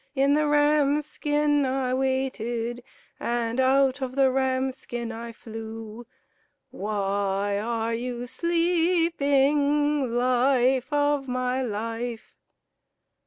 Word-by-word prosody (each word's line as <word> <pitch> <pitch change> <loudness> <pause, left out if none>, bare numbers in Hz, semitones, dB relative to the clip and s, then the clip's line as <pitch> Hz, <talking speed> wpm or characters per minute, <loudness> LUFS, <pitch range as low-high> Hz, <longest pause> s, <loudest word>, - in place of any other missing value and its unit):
In 275 +1 +3
the 300 0 +2
ram's 295 0 +3
skin 295 -1 +1
I 260 -1 -1
waited, 245 -3 -2 0.4
And 235 0 -1
out 265 +1 +3
of 260 -1 -4
the 270 -1 +4
ram's 260 0 0
skin 235 -3 -6
I 230 +1 -7
flew. 225 0 -9 0.6
Why 200 0 -1
are 230 +1 -2
you 240 +1 -4
sleeping, 295 -3 +1
Life 255 +1 +2
of 290 -1 +1
my 255 +1 -1
life?" 230 0 -4
260 Hz, 100 wpm, -25 LUFS, 235-285 Hz, 0.6 s, the